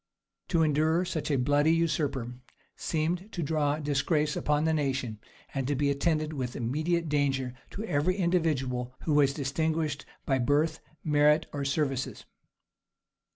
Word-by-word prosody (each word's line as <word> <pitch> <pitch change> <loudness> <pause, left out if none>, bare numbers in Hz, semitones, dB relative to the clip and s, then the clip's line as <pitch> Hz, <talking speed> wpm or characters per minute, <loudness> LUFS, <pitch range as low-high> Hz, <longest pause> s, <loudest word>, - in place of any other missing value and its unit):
To 165 -3 +2
endure 160 +3 +2
such 165 -4 -3
a 140 - +2
bloody 145 +4 +3
usurper 145 -7 0 0.4
seemed 175 +6 -2
to 175 - -2
draw 150 -1 +1
disgrace 150 +1 0
upon 150 0 +1
the 160 0 +2
nation, 135 -7 -1 0.3
and 135 -2 -1
to 145 - +1
be 140 +1 +2
attended 155 +2 0
with 125 -4 -4
immediate 155 +8 0
danger 135 -4 0 0.2
to 210 - -6
every 180 -2 +1
individual 145 -9 0
who 155 - 0
was 145 -2 +5
distinguished 155 +2 -1 0.2
by 135 -2 +1
birth, 145 +5 +2 0.2
merit, 150 +1 +4
or 145 -1 -2
services. 140 -2 -1
150 Hz, 140 wpm, -29 LUFS, 140-160 Hz, 0.4 s, was